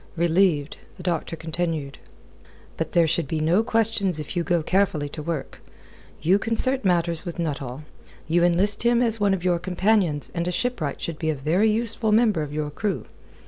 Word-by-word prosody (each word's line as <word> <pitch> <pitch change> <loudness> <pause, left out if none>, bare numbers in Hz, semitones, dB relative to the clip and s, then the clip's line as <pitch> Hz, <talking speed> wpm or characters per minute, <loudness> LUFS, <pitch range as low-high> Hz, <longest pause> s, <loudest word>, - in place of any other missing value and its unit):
Relieved, 170 -3 +1 0.2
the 180 - -11
doctor 170 -2 -2
continued: 160 -3 -3 0.8
"But - - -4
there 170 -1 +5
should 165 -1 0
be 160 +3 -2
no 165 +7 +3
questions 225 -6 0
if 150 - -6
you 175 - 0
go 170 -1 0
carefully 180 -5 +1
to 150 - -7
work. 155 -2 -5 0.6
You 185 +5 +4
concert 255 +4 +1
matters 170 -3 +1
with 175 -3 -6
Nuttall. 145 -4 -4 0.4
You 170 +2 +2
enlist 180 +4 +4
him 240 +1 +3
as 225 -2 +2
one 200 -2 +3
of 180 -1 -7
your 175 -2 +2
companions 180 -4 0
and 170 0 -2
a - - 0
shipwright 180 - -2
should 165 -2 -4
be 160 - -1
a 155 - 0
very 165 +10 +2
useful 225 0 0
member 215 -6 +3
of 150 -1 -5
your 150 0 -3
crew. 200 +6 -3
175 Hz, 185 wpm, -24 LUFS, 155-205 Hz, 0.8 s, there